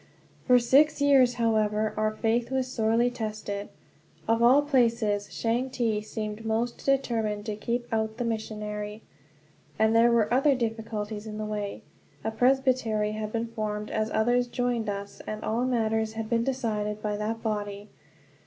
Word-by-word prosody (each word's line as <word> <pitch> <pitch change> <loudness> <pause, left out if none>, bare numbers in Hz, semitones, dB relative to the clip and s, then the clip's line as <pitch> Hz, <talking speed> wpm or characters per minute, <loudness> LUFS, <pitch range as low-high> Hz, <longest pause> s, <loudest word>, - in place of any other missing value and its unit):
For 250 -2 +7
six 280 +6 +4
years, 270 -4 +5
however, 215 -2 +1
our 215 0 +1
faith 230 +2 0
was 265 -1 0
sorely 235 -1 +1
tested. 215 -3 -4 0.6
Of 225 +1 +2
all 260 +5 +6
places, 230 -7 +1
Changte 235 -2 -1
seemed 215 0 -5
most 225 +2 -2
determined 225 -6 0
to 215 -2 -3
keep 235 +3 -2
out 220 0 -1
the 245 - -2
missionary. 210 -1 -4 0.7
And 220 +1 +3
there 235 +1 +6
were 235 -1 +2
other 275 +2 +4
difficulties 220 -2 -3
in 210 0 -6
the 215 - -3
way. 210 -1 -4 0.4
A 220 - -1
presbytery 245 -3 +2
had 215 0 -4
been 230 0 -2
formed 210 -2 -4
as 215 0 0
others 245 +3 +2
joined 240 -3 -1
us, 200 0 -6
and 215 0 -5
all 235 +3 0
matters 220 -3 0
had 220 0 -5
to 235 - +4
be - - 0
decided 215 -5 -2
by 210 -1 -1
that 220 +2 -3
body. 205 -2 -3
225 Hz, 155 wpm, -27 LUFS, 215-240 Hz, 0.7 s, For